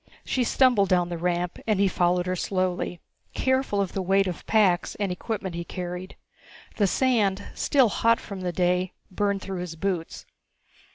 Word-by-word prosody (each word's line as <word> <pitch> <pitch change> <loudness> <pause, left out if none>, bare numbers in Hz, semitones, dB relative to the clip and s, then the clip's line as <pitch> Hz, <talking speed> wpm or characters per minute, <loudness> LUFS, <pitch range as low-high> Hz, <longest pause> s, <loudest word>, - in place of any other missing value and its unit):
She 255 - +1
stumbled 240 -5 +3
down 180 -2 +2
the 170 - -3
ramp 175 0 -1
and 215 -3 +2
he 200 - +4
followed 180 -1 +1
her 185 0 -1
slowly, 185 -1 -1 0.4
careful 260 -5 +1
of 195 -3 -1
the 195 - -1
weight 195 +2 +3
of 180 -4 -4
packs 195 -5 +3
and 200 -3 -2
equipment 190 0 -4
he 170 0 -4
carried. 180 +1 -6 0.6
The 205 - +3
sand, 210 -4 +2
still 265 -6 +3
hot 230 +3 +2
from 195 -3 -8
the 180 -1 -2
day, 180 +1 +1 0.2
burned 200 0 -1
through 190 -2 -4
his 175 -2 -5
boots. 175 -1 -3
185 Hz, 170 wpm, -26 LUFS, 180-205 Hz, 0.6 s, he